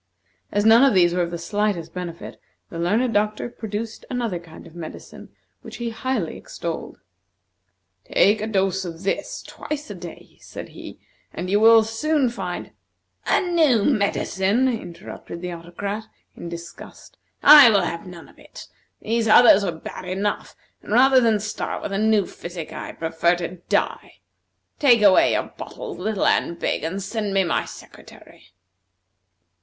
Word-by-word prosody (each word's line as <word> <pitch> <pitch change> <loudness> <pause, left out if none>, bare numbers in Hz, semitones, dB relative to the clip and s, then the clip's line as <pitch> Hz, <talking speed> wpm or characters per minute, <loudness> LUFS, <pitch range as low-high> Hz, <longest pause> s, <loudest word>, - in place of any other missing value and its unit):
As 205 +1 0
none 225 +3 +7
of 270 -6 +4
these 175 -2 +4
were 180 - 0
of 170 - -1
the 170 - -5
slightest 195 -1 -2
benefit, 175 -2 -7 0.3
the 165 - -6
learned 220 +8 +1
doctor 210 +2 0
produced 220 -1 -6
another 235 -8 -2
kind 165 -2 -14
of - - -14
medicine 170 -2 -10 0.3
which - - -10
he 235 -1 -4
highly 225 -6 -3
extolled. 170 -1 -6 1.1
"Take 205 +2 +4
a 215 - -2
dose 190 -3 0
of 170 0 -8
this 200 +10 -3
twice 300 -6 -7
a - - -4
day," 175 -3 -12
said - - -9
he, - - -11 0.3
"and 180 +1 -5
you 205 - +3
will 225 0 +7
soon 260 +5 0
find 185 -6 -6 0.3
" - - -52
"A - - +3
new 320 - +2
medicine?" 200 0 +1
interrupted 175 -6 -6
the 180 0 -5
Autocrat, 200 +6 -6 0.3
in 170 - -8
disgust. 170 0 -11 0.2
"I 290 -5 +10
will 205 -3 +3
have 170 +2 -4
none 175 -2 -11
of - - -21
it! - - -13 0.3
These 225 +1 0
others 215 -2 +7
were 185 - -1
bad 160 +2 -9
enough, 195 +3 -3 0.3
and - - -6
rather 260 +2 +6
than 225 -3 +2
start 210 +1 -4
with - - -4
a 195 - -1
new 215 -2 +3
physic, 175 -3 -8
I - - -7
prefer 165 +2 0
to 175 +1 -6
die. - - -1 0.6
Take 240 -7 +5
away 195 -2 +5
your - - -2
bottles, - - -8
little 210 +1 -1
and 170 - +1
big, - - -2
and 185 +5 -3
send 205 -1 -3
me 195 - +4
my 170 - -1
secretary." 85 - -15
200 Hz, 160 wpm, -22 LUFS, 175-225 Hz, 1.1 s, I